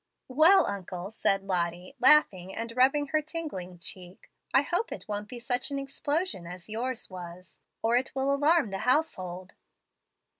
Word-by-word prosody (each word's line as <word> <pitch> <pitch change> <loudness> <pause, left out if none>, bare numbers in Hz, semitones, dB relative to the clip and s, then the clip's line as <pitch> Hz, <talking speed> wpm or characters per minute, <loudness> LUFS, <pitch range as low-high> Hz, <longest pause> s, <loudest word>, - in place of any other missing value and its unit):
"Well, 315 +9 +6
uncle," 190 -1 -5
said 195 -3 +1
Lottie, 180 +1 -2
laughing 205 -10 +4
and 230 0 -5
rubbing 275 +3 +3
her 310 - +2
tingling 295 - -6
cheek, 180 +1 -8 0.2
"I 270 - +5
hope 350 +10 -1
it - - -7
won't 210 0 -4
be 250 - -8
such 245 +3 -1
an 280 - -3
explosion 275 - -2
as 180 0 -9
yours 235 +3 -3
was, 180 -2 -10 0.2
or 230 +2 +3
it 255 +1 -1
will 270 +1 +1
alarm 290 -4 +3
the 195 - -3
household." 185 - -1
230 Hz, 155 wpm, -28 LUFS, 185-280 Hz, 0.2 s, Well